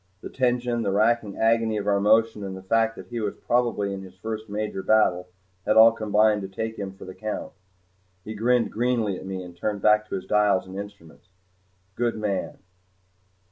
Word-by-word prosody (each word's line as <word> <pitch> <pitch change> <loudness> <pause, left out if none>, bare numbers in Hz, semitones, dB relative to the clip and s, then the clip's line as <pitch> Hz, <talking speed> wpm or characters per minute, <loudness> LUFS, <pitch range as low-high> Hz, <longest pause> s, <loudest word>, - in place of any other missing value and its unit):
The - - -8
tension, 120 -2 0
the 100 - -1
racking 110 0 +1
agony 115 -1 +2
of 100 - -3
our 100 -1 +2
motion, 110 +1 +3
and 95 -1 -5
the 95 - -11
fact 115 +3 +1
that - - -11
he 120 -1 -4
was 105 -2 -3
probably 120 -5 0
in 95 - -6
his 95 -1 -12
first 110 +1 -6
major 105 -1 -3
battle 95 -4 +2 0.4
had 105 +2 +2
all 115 +1 +9
combined 105 -1 +2
to 95 - -5
take 110 +4 -5
him 95 -2 -6
for 95 - -12
the 95 - -8
count. 110 +1 -5 0.7
He 110 - -6
grinned 120 +2 +1
greenly 115 -4 0
at - - -9
me 95 -1 -5
and 90 -1 -11
turned 100 +3 -3
back 105 0 +4
to - - -3
his 95 - -5
dials 105 -3 +2
and 95 0 -10
instruments. 100 -4 -10 0.7
Good 120 -1 0
man! 105 -3 -3
105 Hz, 195 wpm, -25 LUFS, 100-115 Hz, 0.7 s, all